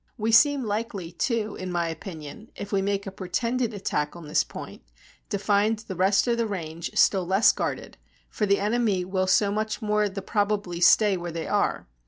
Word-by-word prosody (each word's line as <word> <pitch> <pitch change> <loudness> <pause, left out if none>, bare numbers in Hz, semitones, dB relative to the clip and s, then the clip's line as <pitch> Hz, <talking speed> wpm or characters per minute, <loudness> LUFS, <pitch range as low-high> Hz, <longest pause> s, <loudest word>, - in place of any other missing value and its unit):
We 220 +1 0
seem 280 +4 +5
likely, 205 -5 -3
too, 220 +3 -1
in 185 -1 -5
my 170 -1 0
opinion, 165 +4 -8
if 200 - -7
we 195 -2 +1
make 200 0 -1
a 195 - -5
pretended 230 +6 -2
attack 160 -8 -2
on 170 -3 -10
this 150 - +2
point, - - -9 0.5
to 200 - -1
find 205 +2 +2
the 210 -3 -8
rest 190 +3 +3
of 235 -1 +1
the 230 - +1
range 170 -4 -5
still 190 -2 +4
less 195 +4 +5
guarded; - - -4 0.3
for 210 - -2
the 200 0 +3
enemy 210 -3 +1
will 185 0 -1
so 200 +2 +3
much 215 +1 -2
the 225 - -7
more 210 0 +2
probably 200 -2 -2
stay 200 +2 +5
where 175 -1 -5
they 165 0 -4
are. - - 0
200 Hz, 195 wpm, -26 LUFS, 180-215 Hz, 0.5 s, seem